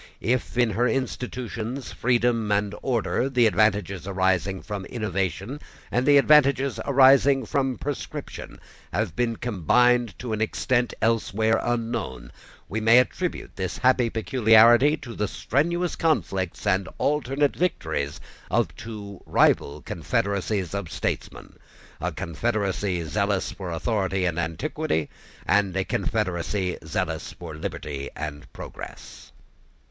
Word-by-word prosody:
If, 120 +2 -1
in 120 -2 +3
her 120 +5 +1
institutions, 125 -1 -3
freedom 120 -3 +1
and 105 0 +1
order, 125 +1 0
the 125 -3 +3
advantages 100 -4 +1
arising 95 0 0
from 100 -3 -5
innovation 100 - -3 0.3
and 125 +2 +1
the 145 -1 +7
advantages 140 -3 +4
arising 135 -1 +5
from 130 +1 0
prescription, 145 -1 -6 0.3
have 80 - -1
been 115 +1 0
combined 120 +3 +2
to 120 -3 -4
an 110 - -2
extent 120 +2 0
elsewhere 110 0 +2
unknown, 115 - -3 0.4
we 110 +2 -3
may 115 +2 +6
attribute 170 +8 0
this 95 -2 -3
happy 125 -2 +3
peculiarity 115 +5 +5
to 120 -5 -9
the 105 -1 -1
strenuous 170 - 0
conflicts 95 - -1
and 95 0 +1
alternate 145 -1 +1
victories 80 - -2 0.3
of - - 0
two 105 -4 -8
rival 70 +1 +2
confederacies 95 +4 -1
of 100 -5 -4
statesmen, - - -4 0.4
a - - -2
confederacy 100 -1 -1
zealous 100 +3 -1
for 95 -3 -7
authority 95 +1 -1
and 85 -1 -1
antiquity, 80 -2 -2 0.3
and 100 -1 +2
a 95 - 0
confederacy 95 -2 -1
zealous - - -3
for 85 -3 -9
liberty 75 -2 -5
and 75 -1 -6
progress. - - -10
110 Hz, 120 wpm, -25 LUFS, 95-125 Hz, 0.4 s, the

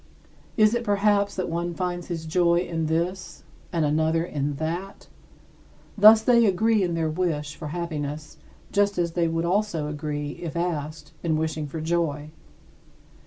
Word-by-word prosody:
Is 215 0 +5
it, 240 0 0
perhaps, 205 -1 +2
that 185 - -2
one 170 +1 -3
finds 175 -1 -3
his 165 -2 -4
joy 170 +1 +2
in 165 -3 -2
this 175 +4 -2 0.3
and 165 -3 +1
another 160 +2 +1
in 145 -3 -2
that? 170 +6 -5 0.9
Thus 215 +1 +8
they 235 -1 +5
agree 215 +3 +2
in 175 -3 0
their 165 -1 0
wish 155 -3 -2
for 155 - -7
happiness 150 -2 -5 0.3
just 200 -1 +2
as 170 -1 0
they 170 0 +1
would 165 +1 -1
also 180 -4 0
agree, 150 -1 -4
if 170 -1 -5
asked, 155 -3 -3
in 160 -2 0
wishing 155 -1 -2
for 160 +3 -6
joy. 155 -2 -1
170 Hz, 155 wpm, -25 LUFS, 155-185 Hz, 0.9 s, Thus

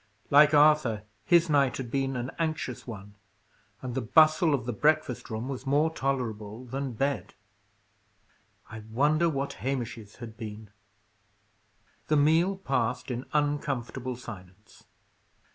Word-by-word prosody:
Like 150 +1 +7
Arthur, 145 -8 +4 0.2
his 170 0 +5
night 140 -4 +2
had 120 -3 -6
been 135 0 -1
an 125 +1 -3
anxious 155 -7 -3
one, 105 -3 -9 0.7
and 125 -2 -4
the 130 - -1
bustle 155 - +4
of 125 -4 -5
the 120 - -2
breakfast 150 0 +1
room 110 +3 -4
was 135 0 -6
more 150 +4 +2
tolerable 120 -5 -3
than 135 +1 -4
bed. 140 +4 -2 1.4
I 110 - -7
wonder 150 +8 +2
what 140 -2 -2
Hamish's 120 -5 -4
had 115 -2 -10
been! 105 -1 -8 1.4
The 155 - +3
meal 165 +6 +3
passed 125 -6 -1
in 125 +1 -4
uncomfortable 140 -4 -1
silence. 105 -4 -12
135 Hz, 125 wpm, -28 LUFS, 115-150 Hz, 1.4 s, Like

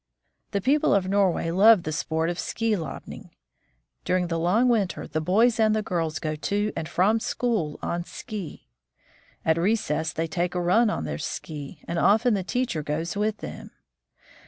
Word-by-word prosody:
The 200 - -1
people 280 +4 +3
of 190 -2 +1
Norway 190 -4 +1
love 200 +1 +6
the 155 - -3
sport 160 +1 -1
of 175 - -6
ski 225 -1 0
lobning. 160 -7 -7 0.7
During 180 -1 0
the 165 -1 -1
long 195 +9 +3
winter 220 -6 0
the 155 - -2
boys 220 +8 +3
and 215 -1 +4
the 215 - 0
girls 165 -5 -2
go 155 -1 -3
to 205 +7 -1
and 160 -1 -4
from 210 +5 +2
school 220 -11 -1
on 170 0 -2
ski. 200 -7 -8 0.8
At 160 +1 +3
recess 165 -5 0
they 165 - -2
take 175 +2 -2
a - - +1
run 200 +7 +3
on - - -2
their - - -4
ski, 150 -1 -6
and 170 0 -2
often 220 +6 +4
the 195 -2 0
teacher 245 -6 -1
goes 160 +3 -3
with 210 +1 -1
them. - - -8
180 Hz, 175 wpm, -25 LUFS, 165-215 Hz, 0.8 s, love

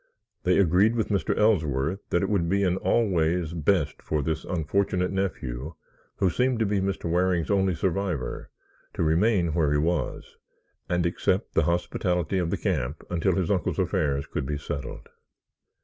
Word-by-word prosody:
They 90 0 +4
agreed 100 +4 +4
with 110 - -1
Mr. 100 -5 0
Ellsworth 80 -5 +1
that 85 - +1
it - - -1
would 90 -5 +1
be 100 +2 +2
in 90 -1 +1
all 115 +4 +2
ways 85 -2 0
best 80 -2 0
for 75 -2 -1
this 80 +2 -2
unfortunate 90 +2 0
nephew, 80 -7 -3 0.4
who 95 -2 +1
seemed 125 +5 +1
to 110 - +1
be 100 -1 0
Mr. 95 -2 -2
Waring's 90 +1 +1
only 95 -2 +2
survivor, 85 -7 -2 0.5
to - - 0
remain 85 +1 +2
where 80 -3 +2
he 75 - +3
was, 80 -1 -2 0.5
and 90 -1 +1
accept 90 +3 0
the 80 - +2
hospitality 90 +1 0
of 85 -2 -1
the - - -1
camp 75 - -2
until 90 +1 +1
his 95 -2 0
uncle's 95 -3 0
affairs 70 -2 0
could 65 - -4
be 75 0 -2
settled. 70 -2 -6
90 Hz, 165 wpm, -26 LUFS, 80-95 Hz, 0.5 s, They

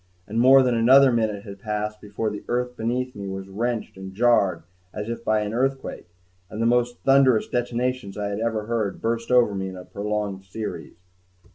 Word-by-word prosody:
And 110 +2 -3
more 130 +2 +7
than 125 -1 +1
another 130 +4 +6
minute 110 -4 0
had 100 -2 -10
passed 105 0 -4
before 105 +1 -3
the 105 - -7
earth 125 0 -1
beneath 125 +3 -2
me 100 -1 -6
was 95 0 -6
wrenched 115 +1 -3
and 95 0 -9
jarred 100 -7 +3 0.3
as 105 +1 -5
if 115 0 -5
by 110 -1 +2
an 105 0 -3
earthquake 135 -2 -2 0.4
and 110 - -7
the 115 - +1
most 120 +1 +2
thunderous 135 -4 +4
detonations 120 -3 -2
I 100 -1 -2
had 100 +1 -3
ever 110 -2 -1
heard 110 -3 -2
burst 115 0 -2
over 125 -4 +4
me 95 -1 -3
in 95 - -9
a 90 - -10
prolonged 105 -1 -3
series. 105 +3 -6
110 Hz, 190 wpm, -24 LUFS, 100-120 Hz, 0.4 s, more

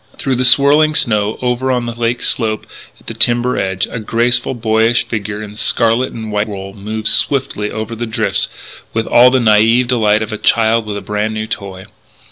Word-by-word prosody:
Through 130 -2 -1
the 130 - +1
swirling 145 +4 +4
snow, 105 -6 0
over 125 +1 0
on 125 -1 -1
the 120 - -4
lake 120 +1 -2
slope 110 -3 -1 0.3
at - - -24
the - - -6
timber 120 +1 +1
edge, 95 0 -1
a 125 - -4
graceful, 120 +3 0
boyish 115 0 +1
figure 105 -1 -4
in 105 -1 -9
scarlet 115 +3 0
and 110 -2 -7
white 105 +1 -1
wool 95 -2 -7
moved 110 +2 -5
swiftly 130 -7 +1
over 110 +1 -5
the 120 +1 -4
drifts 110 - 0 0.5
with 115 -1 0
all 125 +1 +5
the 130 - +2
naïve 115 +2 +3
delight 110 -3 +2
of 110 - -7
a 105 - -5
child 115 -1 +2
with 105 -1 -4
a - - -6
brand 105 +1 -3
new 110 0 -3
toy. 100 -4 -6
110 Hz, 195 wpm, -15 LUFS, 105-120 Hz, 0.5 s, all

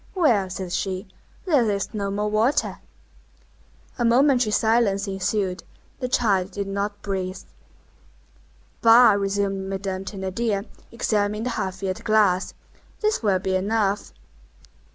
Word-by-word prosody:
"Well," 235 - +3
said 185 -1 -5
she, 190 0 -2 0.4
"there 280 - +3
is 200 +1 -2
no 200 -2 -2
more 205 +1 -1
water!" 230 +8 +1 1.2
A - - +1
momentary 245 0 +4
silence 215 -2 +2
ensued. 190 -2 -2 0.4
The 255 - -2
child 200 -7 +1
did 200 +1 -4
not 200 +1 -3
breathe. 190 -2 -3 1.4
"Bah!" 230 +1 +7
resumed 195 -1 -1
Madame 190 -1 -3
Thénardier, 200 +2 -2 0.3
examining 210 -2 -1
the 250 - -2
half 190 -5 -3
filled 190 -1 -4
glass, 210 -4 +2 0.5
"this 430 0 +1
will 200 -4 +2
be 190 0 -1
enough." 205 +1 0
205 Hz, 120 wpm, -23 LUFS, 195-225 Hz, 1.4 s, Bah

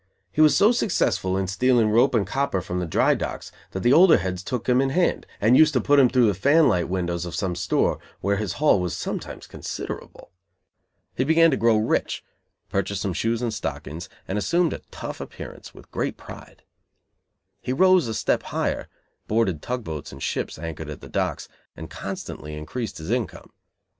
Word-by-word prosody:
He 130 - +1
was 155 -1 +6
so 210 +3 +6
successful 95 - +1
in 95 - 0
stealing 115 +3 +2
rope 120 +4 +4
and 105 -4 +2
copper 135 -2 -1
from 90 -1 -4
the 90 - -2
dry - - +3
docks - - -5 0.2
that 95 - -5
the 120 +5 +4
older 175 +2 +7
heads 90 0 -3
took 120 +4 -4
him 125 +1 +4
in 135 - +1
hand 175 +6 +1
and 110 +5 +4
used 155 +2 +6
to 130 - +3
put 145 +5 +4
him 130 -3 +6
through 125 -1 +4
the 105 - +3
"fan 140 - +4
light" 85 -1 +1
windows 85 -2 -2
of 85 0 -5
some 95 -3 -1
store, 85 - 0 0.2
where 100 +1 0
his 105 -3 -2
haul 150 -9 +3
was 90 -1 -2
sometimes - - -5
considerable. - - -7 0.8
He 130 - 0
began 160 +3 +5
to - - +2
grow 115 -1 +3
rich, 110 - -1 0.4
purchased 100 0 -2
some 95 - -1
shoes 115 +7 -1
and 115 -2 -1
stockings, 85 -2 -5 0.2
and 100 +2 -1
assumed 170 +8 +1
a - - -7
"tough" - - -7
appearance, - - -9
with - - -16
great - - -2
pride. - - -12 1.0
He - - -3
rose 185 +1 +4
a 110 - -3
step - - +1
higher, - - -2 0.4
boarded 100 -8 +1
tug 125 -1 -3
boats 80 -5 -6
and 70 0 -9
ships - - -2
anchored 80 -1 -6
at 75 - -8
the - - -11
docks, - - -2 0.3
and - - -8
constantly 75 0 -6
increased 110 +10 -5
his 80 +6 -6
income. 120 -4 -3
110 Hz, 195 wpm, -24 LUFS, 90-130 Hz, 1.0 s, older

